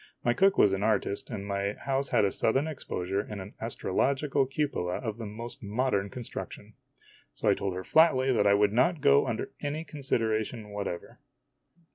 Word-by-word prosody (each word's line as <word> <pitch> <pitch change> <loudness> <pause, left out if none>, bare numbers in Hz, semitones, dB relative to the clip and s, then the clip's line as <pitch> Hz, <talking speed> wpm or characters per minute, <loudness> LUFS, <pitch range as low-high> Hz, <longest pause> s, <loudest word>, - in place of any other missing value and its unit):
My 120 - +3
cook 195 +8 +3
was 100 - +5
an 95 - -1
artist, 105 -2 0
and 100 -4 -5
my 100 0 -1
house 135 +3 -2
had - - +3
a 100 - +1
southern 135 +9 +1
exposure 100 - -3
and 105 0 -5
an 95 +3 -8
astrological 135 +5 0
cupola 135 - -1
of 115 -3 -4
the 115 - -5
most 115 +6 -8
modern 105 -2 0
construction. 120 +3 -7 0.6
So - - -3
I - - +6
told 95 -2 -3
her 95 - -4
flatly 135 - +4
that 105 -3 +3
I 100 - +6
would 105 0 +3
not 140 +7 +2
go 70 - +5
under - - -3
any 150 +2 -3
consideration 115 -7 -2
whatever. 100 -4 -5
110 Hz, 175 wpm, -29 LUFS, 100-135 Hz, 0.6 s, I